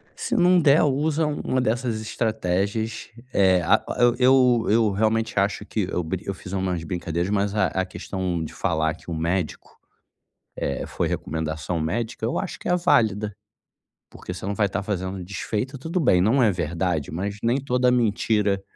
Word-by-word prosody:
se -, -, -2 dB
não 180 Hz, 0 st, +5 dB
der 150 Hz, -1 st, +5 dB
usa 150 Hz, +3 st, +1 dB
um 150 Hz, -, -3 dB
uma 130 Hz, -, 0 dB
dessas 120 Hz, -1 st, -1 dB
estratégias 110 Hz, 0 st, -2 dB, 0.2 s
eh, 95 Hz, -2 st, +4 dB
ah -, -, +4 dB
o -, -, -1 dB
eu 120 Hz, 0 st, +5 dB
eu 125 Hz, -2 st, +4 dB
eu 110 Hz, -1 st, +3 dB
realmente 110 Hz, +2 st, 0 dB
acho 100 Hz, +1 st, 0 dB
que 105 Hz, -3 st, -2 dB
eu 90 Hz, -, -1 dB
bri 85 Hz, +3 st, -4 dB
eu 100 Hz, -, -2 dB
fiz 95 Hz, 0 st, -10 dB
umas 95 Hz, -3 st, -1 dB
brincadeiras, 85 Hz, +1 st, -2 dB
mas 100 Hz, 0 st, 0 dB
a 105 Hz, -, +3 dB
a 95 Hz, 0 st, -1 dB
questão 95 Hz, -2 st, -3 dB
de 80 Hz, -, -7 dB
falar 80 Hz, 0 st, 0 dB
que 90 Hz, -, -14 dB
o -, -, -1 dB
médico, 85 Hz, +1 st, -3 dB, 0.8 s
eh -, -, -2 dB
foi -, -, -1 dB
recomendação 80 Hz, +2 st, -3 dB
médica, 110 Hz, +8 st, -2 dB
eu 115 Hz, -, -1 dB
acho 190 Hz, -, -4 dB
que -, -, -5 dB
é 180 Hz, -, +4 dB
válida, 110 Hz, -, +2 dB, 0.8 s
porque 90 Hz, -, -7 dB
você 90 Hz, -, -7 dB
não 100 Hz, -, -1 dB
vai 105 Hz, 0 st, +2 dB
estar 100 Hz, +1 st, -3 dB
fazendo 95 Hz, -2 st, -3 dB
desfeita. 105 Hz, +8 st, -4 dB
Tudo 165 Hz, +6 st, -2 dB
bem 95 Hz, -, +4 dB
não 120 Hz, +7 st, +3 dB
é 110 Hz, -, +4 dB
verdade, 85 Hz, -2 st, -2 dB
mas 100 Hz, +5 st, -3 dB
nem 120 Hz, +3 st, +2 dB
toda 125 Hz, -2 st, +1 dB
mentira 105 Hz, -4 st, +1 dB
100 Hz, 180 wpm, -24 LUFS, 90-120 Hz, 0.8 s, não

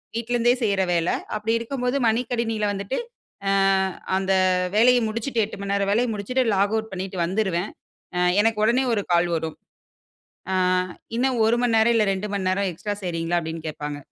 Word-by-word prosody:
வீட்ல 235 Hz, +1 st, -2 dB
இருந்தே 240 Hz, +1 st, +4 dB
செய்ற 200 Hz, -3 st, +1 dB
வேல. 170 Hz, 0 st, +1 dB, 0.3 s
அப்படி 215 Hz, +2 st, -1 dB
இருக்கும்போது 250 Hz, +2 st, -2 dB
மடி 230 Hz, +3 st, +2 dB
கணினில 225 Hz, -3 st, -1 dB
வந்துட்டு, 200 Hz, +5 st, -3 dB, 0.5 s
அ -, -, +3 dB, 0.7 s
அந்த 190 Hz, 0 st, 0 dB, 0.4 s
வேலைய 245 Hz, +2 st, +6 dB
முடிச்சுட்டு 230 Hz, +1 st, -1 dB
8 205 Hz, -, -10 dB
மணி 200 Hz, 0 st, -2 dB
நேர 200 Hz, 0 st, +1 dB
வேலைய 235 Hz, +3 st, +2 dB
முடிச்சுட்டு 250 Hz, +6 st, 0 dB
லாக்அவுட் 215 Hz, +2 st, 0 dB
பண்ணீட்டு 185 Hz, 0 st, -5 dB
வந்துருவேன். 190 Hz, 0 st, -1 dB, 0.5 s
அ -, -, +1 dB, 0.2 s
எனக்கு 225 Hz, -1 st, +1 dB
ஒடனே 245 Hz, +4 st, +3 dB
1 205 Hz, -, +1 dB
கால் 175 Hz, 0 st, +3 dB
வரும். 160 Hz, -1 st, -3 dB, 1.0 s
"அ -, -, +1 dB, 0.6 s
இன்னும் 250 Hz, -1 st, +1 dB
1 235 Hz, +2 st, +3 dB
மணிநேரம், 230 Hz, 0 st, +3 dB
இல்ல 215 Hz, -2 st, +3 dB
2 200 Hz, +2 st, -4 dB
மணி 190 Hz, -2 st, -1 dB
நேரம் 195 Hz, 0 st, 0 dB
எக்ஸ்ட்ரா 205 Hz, +5 st, -4 dB
செய்றீங்களா?" 170 Hz, 0 st, -1 dB
அப்படீன்னு 160 Hz, 0 st, -6 dB
கேட்பாங்க. 145 Hz, -1 st, -5 dB
210 Hz, 165 wpm, -23 LUFS, 190-230 Hz, 1.0 s, வேலைய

